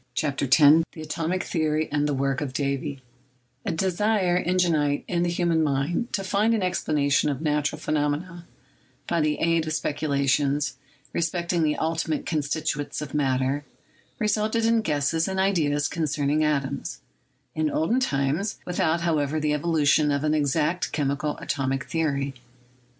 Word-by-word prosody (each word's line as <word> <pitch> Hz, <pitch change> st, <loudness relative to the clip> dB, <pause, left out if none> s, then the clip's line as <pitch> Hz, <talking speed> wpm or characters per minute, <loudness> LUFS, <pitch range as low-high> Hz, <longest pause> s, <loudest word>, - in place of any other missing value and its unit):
CHAPTER 140 Hz, -2 st, 0 dB
X 135 Hz, +2 st, +5 dB
TJSE 155 Hz, +1 st, +7 dB, 0.2 s
ATOMIC 165 Hz, +4 st, -2 dB
THEORY 155 Hz, -1 st, 0 dB
AND 150 Hz, 0 st, +1 dB
THE 145 Hz, -, 0 dB
WORK 135 Hz, 0 st, 0 dB
OF 140 Hz, -3 st, -3 dB
DAVY 140 Hz, 0 st, -2 dB, 0.6 s
A -, -, +1 dB
desire 190 Hz, +1 st, +1 dB
ingenite 165 Hz, -5 st, +1 dB
in 170 Hz, -1 st, 0 dB
the 175 Hz, -, +1 dB
human 170 Hz, -2 st, +1 dB
mind 155 Hz, -, 0 dB
to 195 Hz, -, -1 dB
find 210 Hz, +4 st, +2 dB
an 215 Hz, -, -1 dB
explana 150 Hz, -5 st, 0 dB
tion 145 Hz, -, +3 dB
of 140 Hz, -3 st, -2 dB
natural 150 Hz, -1 st, 0 dB
phenomena, 155 Hz, +4 st, -2 dB, 0.6 s
by 170 Hz, -1 st, +1 dB
the 150 Hz, 0 st, +1 dB
aid 165 Hz, -1 st, +1 dB
of 155 Hz, -, -1 dB
speculations 145 Hz, -2 st, 0 dB, 0.4 s
re -, -, 0 dB
specting 170 Hz, +1 st, -1 dB
the 150 Hz, -1 st, +2 dB
ultimate 160 Hz, -1 st, -1 dB
constituents 150 Hz, -1 st, -2 dB
of 145 Hz, -, -9 dB
matter, 135 Hz, 0 st, 0 dB, 0.5 s
resulted 215 Hz, +1 st, +1 dB
in 230 Hz, 0 st, +3 dB
guesses 160 Hz, -2 st, 0 dB
and 190 Hz, 0 st, -2 dB
ideas 150 Hz, -7 st, +1 dB
concerning 150 Hz, -1 st, 0 dB
atoms, 140 Hz, -3 st, -1 dB, 0.5 s
in 155 Hz, -1 st, 0 dB
olden 165 Hz, -, +1 dB
times, 150 Hz, -, 0 dB
with 180 Hz, -, -4 dB
out, 165 Hz, +1 st, +2 dB
however, 155 Hz, -3 st, 0 dB
the 150 Hz, 0 st, 0 dB
evolution 150 Hz, -1 st, +2 dB
of 140 Hz, 0 st, 0 dB
an 155 Hz, 0 st, +2 dB
exact 155 Hz, +4 st, 0 dB
chemical 145 Hz, 0 st, -1 dB
atomic 135 Hz, 0 st, -2 dB
theory. 140 Hz, -4 st, -1 dB
155 Hz, 150 wpm, -25 LUFS, 145-170 Hz, 0.6 s, TJSE